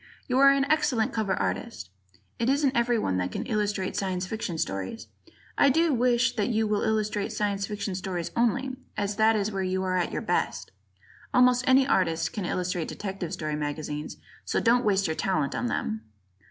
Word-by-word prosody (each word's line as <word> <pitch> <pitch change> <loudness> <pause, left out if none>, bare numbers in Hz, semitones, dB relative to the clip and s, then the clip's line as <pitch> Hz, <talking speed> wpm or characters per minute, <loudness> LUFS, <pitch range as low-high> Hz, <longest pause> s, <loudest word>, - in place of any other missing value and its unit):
You 255 +1 +1
are 275 0 +8
an 275 0 +3
excellent 280 -6 +1
cover 215 -3 0
artist. 230 - -3 0.5
It 235 - +1
isn't 275 -1 +2
everyone 235 - +1
that 90 0 -1
can - - -4
illustrate 210 -4 -1
Science 185 -2 -1
Fiction 190 -4 -4
stories, 95 - -3 0.5
I 280 - +6
do 325 +3 +3
wish 250 0 +2
that 210 +2 +1
you 220 -2 +1
will 210 -1 0
illustrate 215 -2 0
Science 200 -1 -1
Fiction 205 -2 -4
stories 180 -2 -4
only, 255 +3 +1 0.2
as 205 0 -2
that 220 +1 +4
is 210 0 0
where 195 -1 -2
you 185 0 -1
are 185 0 0
at 180 - 0
your - - -3
best. - - -1 0.6
Almost 250 0 +5
any 260 +1 +6
artist 170 -10 +1
can 205 - -3
illustrate 180 -2 -2
detective 190 -4 -5
story 155 -1 -3
magazines, 150 0 -4 0.3
so - - 0
don't 245 +1 +3
waste 195 -2 +2
your 160 - -1
talent 155 -7 0
on 245 - -1
them. 220 -2 -2
210 Hz, 180 wpm, -27 LUFS, 185-245 Hz, 0.6 s, are